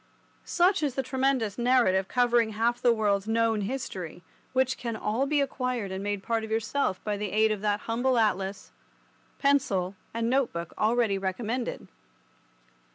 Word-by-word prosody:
Such 370 Hz, +2 st, +3 dB
is 285 Hz, -4 st, -1 dB
the 270 Hz, -, 0 dB
tremendous 260 Hz, -4 st, 0 dB
narrative 235 Hz, -7 st, +3 dB
covering 240 Hz, -2 st, +2 dB
half 235 Hz, +3 st, 0 dB
the 240 Hz, -, +5 dB
world's 205 Hz, -3 st, +1 dB
known 225 Hz, -1 st, +2 dB
history, 195 Hz, -7 st, -5 dB, 0.3 s
which 260 Hz, 0 st, +2 dB
can 235 Hz, -3 st, -4 dB
all 225 Hz, +5 st, -1 dB
be 295 Hz, 0 st, +2 dB
acquired 250 Hz, -7 st, -2 dB
and 190 Hz, +1 st, -4 dB
made 205 Hz, -1 st, -2 dB
part 230 Hz, -1 st, -1 dB
of 220 Hz, -, -6 dB
yourself 220 Hz, -2 st, 0 dB
by 210 Hz, -1 st, -2 dB
the 205 Hz, 0 st, -3 dB
aid 220 Hz, +1 st, +3 dB
of 210 Hz, -2 st, -2 dB
that 205 Hz, -1 st, 0 dB
humble 245 Hz, +2 st, 0 dB
atlas, 195 Hz, -3 st, 0 dB, 0.7 s
pencil, 245 Hz, -10 st, +1 dB, 0.2 s
and 230 Hz, 0 st, -1 dB
note 260 Hz, +1 st, +2 dB
book 170 Hz, -1 st, -6 dB
already 220 Hz, -3 st, +2 dB
recommended. 225 Hz, +6 st, -3 dB
225 Hz, 160 wpm, -28 LUFS, 205-255 Hz, 0.7 s, the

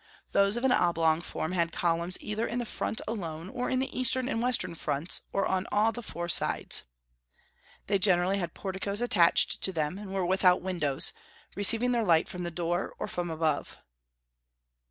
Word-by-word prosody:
Those 200 Hz, +3 st, +3 dB
of 240 Hz, -, -3 dB
an 265 Hz, -, +3 dB
oblong 165 Hz, -5 st, +2 dB
form 165 Hz, -1 st, -4 dB
had 170 Hz, -2 st, 0 dB
columns 170 Hz, +1 st, 0 dB
either 215 Hz, +2 st, -3 dB
in 235 Hz, -, -3 dB
the 240 Hz, -, -2 dB
front 220 Hz, -, -2 dB
alone, 170 Hz, -6 st, -5 dB
or 245 Hz, +4 st, -3 dB
in 260 Hz, -, 0 dB
the 265 Hz, +1 st, -2 dB
eastern 255 Hz, 0 st, 0 dB
and 230 Hz, -4 st, -1 dB
western 245 Hz, -7 st, +1 dB
fronts, 160 Hz, 0 st, 0 dB
or 195 Hz, -, 0 dB
on 185 Hz, 0 st, -1 dB
all 215 Hz, +2 st, +3 dB
the 240 Hz, -, -7 dB
four 175 Hz, -6 st, -6 dB
sides. 170 Hz, -, +1 dB, 1.0 s
They 200 Hz, -1 st, +1 dB
generally 185 Hz, 0 st, +3 dB
had 175 Hz, -, -4 dB
porticos 200 Hz, +2 st, -3 dB
attached 175 Hz, -8 st, +3 dB
to 190 Hz, -, 0 dB
them, 160 Hz, +2 st, -2 dB
and 205 Hz, -2 st, -8 dB
were 190 Hz, -2 st, -1 dB
without 180 Hz, 0 st, +3 dB
windows, 170 Hz, -7 st, +1 dB, 0.4 s
receiving 225 Hz, +5 st, +4 dB
their 235 Hz, -2 st, +1 dB
light 165 Hz, -5 st, +3 dB
from 180 Hz, -, -7 dB
the 175 Hz, -, -3 dB
door 175 Hz, +1 st, -2 dB
or -, -, -4 dB
from 175 Hz, -1 st, -4 dB
above. 160 Hz, -2 st, -1 dB
185 Hz, 180 wpm, -29 LUFS, 170-215 Hz, 1.0 s, receiving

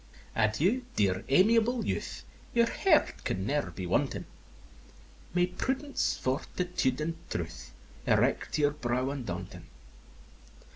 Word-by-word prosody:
XI. -, -, -23 dB
Adieu, 155 Hz, -, +3 dB
dear, 95 Hz, -3 st, +2 dB
amiable 225 Hz, -, +4 dB
youth! -, -, -3 dB, 0.3 s
Your 235 Hz, 0 st, +6 dB
heart 315 Hz, +6 st, +2 dB
can 95 Hz, +1 st, -2 dB
ne'er 145 Hz, -5 st, 0 dB
be 90 Hz, +1 st, -6 dB
wanting! 90 Hz, -, 0 dB, 1.1 s
May 180 Hz, 0 st, +5 dB
prudence, 265 Hz, +10 st, -1 dB
fortitude, 135 Hz, +1 st, -1 dB
and 160 Hz, +2 st, -1 dB, 0.2 s
truth 65 Hz, -8 st, -5 dB, 0.4 s
Erect -, -, +2 dB
your 145 Hz, -1 st, +3 dB
brow 130 Hz, -1 st, -1 dB
undaunting! 140 Hz, -4 st, -6 dB
145 Hz, 110 wpm, -30 LUFS, -, 1.1 s, Your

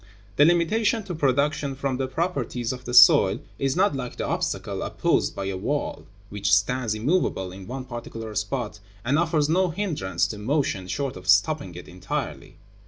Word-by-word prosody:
The 145 Hz, -, +7 dB
limitation 205 Hz, +7 st, +2 dB
to 190 Hz, -, -6 dB
production 140 Hz, -1 st, 0 dB
from 135 Hz, -1 st, -2 dB
the 135 Hz, 0 st, -1 dB
properties 130 Hz, -6 st, -2 dB
of 125 Hz, 0 st, -10 dB
the 125 Hz, -, -5 dB
soil 100 Hz, -4 st, +7 dB, 0.2 s
is 135 Hz, 0 st, 0 dB
not 190 Hz, -4 st, +2 dB
like 125 Hz, -2 st, -5 dB
the -, -, -3 dB
obstacle -, -, -2 dB
opposed -, -, 0 dB
by 100 Hz, -, -4 dB
a 95 Hz, -1 st, -2 dB
wall, 140 Hz, +10 st, -3 dB, 0.2 s
which 100 Hz, -1 st, -1 dB
stands 110 Hz, +3 st, +2 dB
immovable 110 Hz, -, 0 dB
in 95 Hz, 0 st, -10 dB
one 130 Hz, +2 st, -5 dB
particular 115 Hz, -3 st, -7 dB
spot, 105 Hz, +1 st, -3 dB, 0.3 s
and 140 Hz, +5 st, +2 dB
offers 160 Hz, -3 st, +1 dB
no 180 Hz, +3 st, +2 dB
hindrance 160 Hz, -, -1 dB
to 105 Hz, -, -6 dB
motion 110 Hz, -6 st, -1 dB
short 140 Hz, +6 st, -3 dB
of 90 Hz, 0 st, -8 dB
stopping 100 Hz, -, +3 dB
it 90 Hz, -, -9 dB
entirely. 90 Hz, 0 st, -5 dB
130 Hz, 170 wpm, -25 LUFS, 105-150 Hz, 0.3 s, The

